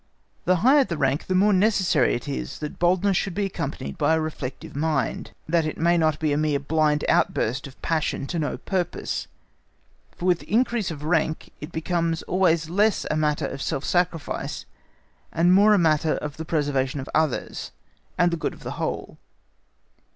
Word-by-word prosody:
The 185 - +4
higher 280 +2 +7
the 170 -10 -4
rank 135 0 0
the 185 - 0
more 205 +3 +4
necessary 195 -1 +3
it 120 - -6
is 140 - -4
that 150 -1 -6
boldness 185 +3 +2
should 190 -1 -1
be 205 - 0
accompanied 70 - -5
by 160 +3 +3
a - - +1
reflective 150 -6 -5
mind, 150 -2 -1 0.2
that 165 +1 +2
it 155 - -3
may 170 +2 +3
not 155 -3 +2
be 155 -1 0
a - - +1
mere 150 -1 +1
blind 150 +1 +1
outburst 130 +7 +1
of 135 - -15
passion 160 -4 -1
to 170 +4 -3
no 150 - -2
purpose; 185 -3 -3 0.9
for 175 - -5
with 180 -2 +3
increase 235 -2 0
of 150 -3 -7
rank 160 0 0
it 150 +3 -7
becomes 165 0 -1
always 170 -3 +2
less 205 +5 +2
a - - +1
matter 150 -1 +1
of 135 - -5
self 135 - -2
sacrifice 175 -3 -1 0.7
and 175 +2 +3
more 205 +3 +6
a - - +3
matter 160 -3 +2
of 150 -1 -5
the 160 - -5
preservation 145 -4 0
of 135 - -6
others, 155 -4 -1 0.5
and 175 0 +3
the 170 - -1
good - - -3
of - - -16
the - - -5
whole. - - -4
160 Hz, 180 wpm, -24 LUFS, 150-180 Hz, 0.9 s, higher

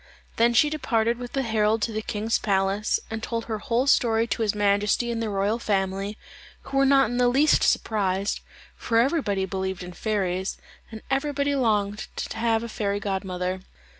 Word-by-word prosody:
Then 235 +1 +3
she 295 +5 +4
departed 235 -6 0
with 245 -1 -7
the 270 - 0
herald 220 -1 +1
to 230 - 0
the 215 0 -3
king's 220 +1 -1
palace, 195 +1 +1
and 220 0 -4
told 230 0 -3
her 220 -2 -3
whole 245 +1 0
story 230 -5 +3
to 230 - -3
his 210 -2 +1
majesty 205 +3 +1
and 230 -1 -2
the 225 - -2
royal 200 +3 0
family, 195 -1 -1 0.5
who 270 - -4
were 275 0 +4
not 270 -2 +4
in 245 - -2
the 250 0 +4
least 275 +5 +4
surprised, 200 -2 +1 0.4
for 230 - -1
everybody 230 - +1
believed 190 -1 -3
in 180 0 -8
fairies, 190 -1 -2 0.3
and 220 -1 -9
everybody 285 +1 0
longed 210 -5 0
to - - -5
have 225 0 +1
a - - -4
fairy 205 -2 -2
godmother. 190 -2 -3
220 Hz, 180 wpm, -25 LUFS, 200-235 Hz, 0.5 s, she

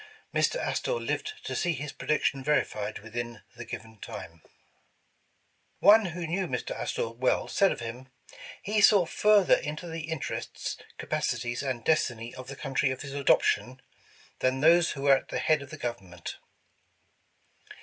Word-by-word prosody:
Mr. - - +2
Astor - - -1
lived 430 - -2
to - - -4
see 175 -2 +1
his 150 0 -5
prediction 140 -3 0
verified 110 -7 0
within 115 +1 -6
the - - -8
given 110 -1 -8
time." 85 -4 -8 1.4
One 215 +1 +7
who 175 -1 -4
knew 180 +3 -1
Mr. 125 -5 -3
Astor 115 - -2
well, 125 +3 +1
said 195 - +3
of - - -4
him. 120 +3 -7 0.2
' - - -16
' - - -15
He 215 - +4
saw 200 -3 +7
further 210 +2 +4
into 150 +4 -1
the 165 -1 -5
interests, 160 -3 -4 0.2
capacities 120 +1 -2
and 130 -4 -3
destiny 120 -7 +1
of 130 -1 -9
the 135 - -7
country 135 0 0
of 130 +1 -4
his 140 -1 -7
adoption, 135 -2 +2 0.6
than 130 +1 +1
those 170 +2 +5
who 135 - -6
were 140 -1 +6
at - - -9
the - - -3
head 150 +3 +2
of 140 - -10
the 155 - -8
government." 95 - -6
135 Hz, 160 wpm, -28 LUFS, 120-160 Hz, 1.4 s, One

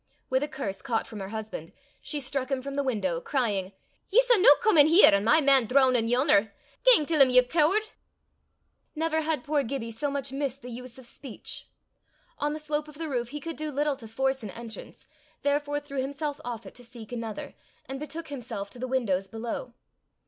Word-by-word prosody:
With 260 0 +2
a 295 - -1
curse 200 -10 -5
caught 225 +2 -1
from 215 - -9
her 190 - -5
husband, 215 -7 -6 0.3
she 295 - -3
struck 265 -1 -3
him 265 -2 -2
from 275 0 -5
the 280 - +1
window, 200 -11 -1
crying, 205 - -1 0.4
"Ye 415 - +1
s' - - +3
no 425 +4 +7
come 435 -5 +3
in 290 - +9
here, 335 +5 +8
an' 200 0 +3
my 305 +9 +5
man 270 -4 +5
droonin' 255 -2 +4
yon'er! 245 -4 +3 0.3
Gang - - +6
till 310 -1 +2
'im, 265 - +7
ye 250 0 +6
cooard!" 340 - +1 1.0
Never 320 0 0
had 310 -4 -1
poor 295 -1 +1
Gibbie 235 -2 -4
so 255 +6 -2
much 280 -1 -3
missed 275 -1 -3
the 250 - -8
use 250 +2 -8
of 260 - -12
speech. 245 0 -9 0.7
On 295 +1 0
the - - -4
slope 300 0 -3
of 300 -1 -13
the 325 -1 -4
roof 240 -3 -2
he 295 +3 -6
could 330 +1 -6
do 310 0 -4
little 290 +1 0
to 230 -4 -11
force 265 +4 -1
an 215 - -6
entrance, 230 +2 -10 0.4
therefore 290 0 0
threw 280 -2 -4
himself 285 +2 -4
off 235 -2 -6
it - - -11
to 245 - -13
seek 235 -2 -11
another, 230 -3 -5 0.3
and 270 0 -6
betook 320 +2 -7
himself 230 -7 -6
to 245 - -11
the 255 - -3
windows 205 -8 0
below. 230 +3 -6
265 Hz, 205 wpm, -27 LUFS, 230-295 Hz, 1.0 s, in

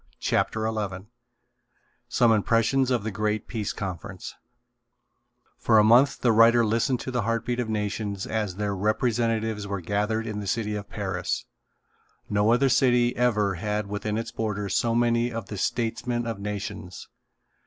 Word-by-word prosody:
CHAPTER 110 -1 0
XI 100 -4 -3 1.0
SOME 120 -1 +3
IMPRESSIONS 115 +4 +2
OF 125 -4 +1
THE 110 - -3
GREAT 105 +1 -2
PEACE 110 -4 -3
CONFERENCE 95 -1 -6 1.3
For 110 - +3
a 105 - +7
month 125 +6 +5
the 120 - +4
writer 115 +1 +6
listened 115 +4 +1
to 130 - -5
the 125 -1 0
heartbeat 115 +2 -1
of 120 -2 -2
nations 105 -2 -2
as 105 -5 -2
their 100 0 -2
representatives 110 0 0
were 100 -1 -3
gathered 105 +5 -1
in 110 -2 -4
the 100 - -5
city 105 0 -1
of 105 -1 -5
Paris. 95 -4 -3 0.8
No 105 +2 +2
other 125 +3 +4
city 125 -1 +3
ever 105 -5 +2
had 105 +4 -2
within 105 +1 -3
its 115 - -4
borders 105 -3 -2
so 115 -1 +1
many 120 0 +2
of 115 -3 -6
the 105 - -5
statesmen 120 +2 -1
of 115 -3 -4
nations. 100 -2 -6
110 Hz, 155 wpm, -26 LUFS, 105-115 Hz, 1.3 s, a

